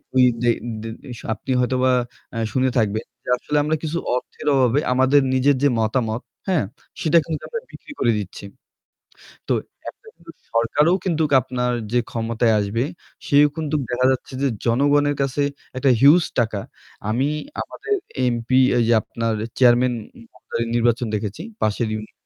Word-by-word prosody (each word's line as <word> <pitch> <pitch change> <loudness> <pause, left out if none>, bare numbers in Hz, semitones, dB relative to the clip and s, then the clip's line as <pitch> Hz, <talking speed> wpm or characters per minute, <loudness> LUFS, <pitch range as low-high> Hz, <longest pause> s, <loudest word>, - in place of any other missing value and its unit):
ওই 130 - +6 0.2
যে 120 - +4 0.3
দে 115 - -5 0.3
শ - - -11
আপনি 130 - -6
হয়তোবা 130 +1 +2 0.4
এ - - -3 0.2
শুনে 130 0 +2
থাকবেন 110 -1 0 0.2
যে - - -8
আসলে 150 - -2
আমরা 155 +2 +1
কিছু 160 +1 -2 0.2
অর্থের 125 - -6
অভাবে 130 +1 +3
আমাদের 130 +3 +4
নিজের 135 +2 +3
যে 145 - +5
মতামত, 110 +1 0 0.3
হ্যাঁ? 185 -4 +2 0.4
সেটা 160 +1 +4
কিন্তুক 160 -2 -4
আমরা 465 - -4
বিক্রি - - -12
করে 120 - +3
দিচ্ছি। 100 0 -8 1.1
তো - - +2 0.4
একটা - - -11
কিন্তু - - -15 0.2
সরকারও 145 +9 +3
কিন্তুক 160 -4 0
আপনার 125 0 -2 0.2
যে 125 - +3
ক্ষমতায় 115 0 +1
আসবে 105 +5 -1 0.4
সেও 145 +1 +6
কিন্তুক 155 -1 -1
দেখা 125 +1 +2
যাচ্ছে 130 +1 -3
যে 140 - +3 0.2
জনগণের 145 +4 +3
কাছে 140 +1 0 0.3
একটা 130 +1 +2
huge 155 +5 +7
টাকা। 110 -3 -1 0.5
আমি 130 +6 +1 0.3
আমাদের 425 - -3 0.4
MP 115 +1 -6 0.3
এই 120 - +4
যে - - +4
আপনার 115 +1 -2 0.2
chairman 125 0 +5 0.4
মহোদয় 115 - -4
নির্বাচন 120 0 +2
দেখেছি 105 -1 -3 0.2
পাশের 110 +2 +1
ইউনি 110 0 -6
125 Hz, 155 wpm, -22 LUFS, 115-145 Hz, 1.1 s, huge